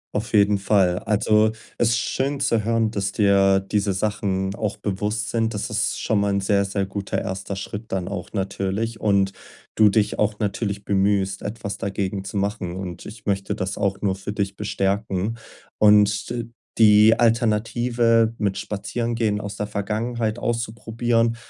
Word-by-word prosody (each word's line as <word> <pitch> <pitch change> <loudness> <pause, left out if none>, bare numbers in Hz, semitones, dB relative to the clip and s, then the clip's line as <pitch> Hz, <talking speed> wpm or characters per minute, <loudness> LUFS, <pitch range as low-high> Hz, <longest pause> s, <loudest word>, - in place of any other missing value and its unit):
Auf 110 +3 -3
jeden 100 -1 +4
Fall. 95 -3 +2
Also, 105 0 +2 0.3
es 115 - +3
ist 115 - +2
schön 135 +4 -1
zu 115 -6 +1
hören, 115 0 +1
dass 100 -2 -2
dir 100 -2 +4
diese 100 0 -1
Sachen 95 -1 -1
auch 105 -2 -3
bewusst 105 +2 -2
sind. 115 -1 0
Das 105 - -3
ist - - -1
schon 110 - +1
mal 100 0 +1
'n 100 - +1
sehr, 100 0 +2
sehr 95 0 -2
guter 100 0 -3
erster 95 +1 -4
Schritt 105 +3 -7
dann 95 -2 -2
auch 100 - -6
natürlich 100 +3 -2
und 100 -2 +2 0.4
du 110 -1 +6
dich 105 +1 +1
auch 105 0 0
natürlich 100 -1 -2
bemühst, 100 -1 +1
etwas 105 -1 -5
dagegen 100 0 -3
zu 100 +1 -5
machen, 100 -3 -2
und 90 -2 -6
ich 110 +1 -11
möchte 100 -1 0
das 95 +1 -3
auch 100 0 -1
nur 95 -2 +1
für 100 +2 -6
dich 100 -1 -2
bestärken. 100 +1 -1 0.4
Und 105 -1 +4
d 120 -1 -4 0.3
die 110 +1 +6
Alternative 115 0 +2
mit 100 -2 0
Spazierengehen 110 +1 -2
aus 100 0 -6
der 105 - -2
Vergangenheit 110 +2 -2
auszuprobieren, 115 0 0
105 Hz, 160 wpm, -23 LUFS, 100-110 Hz, 0.4 s, du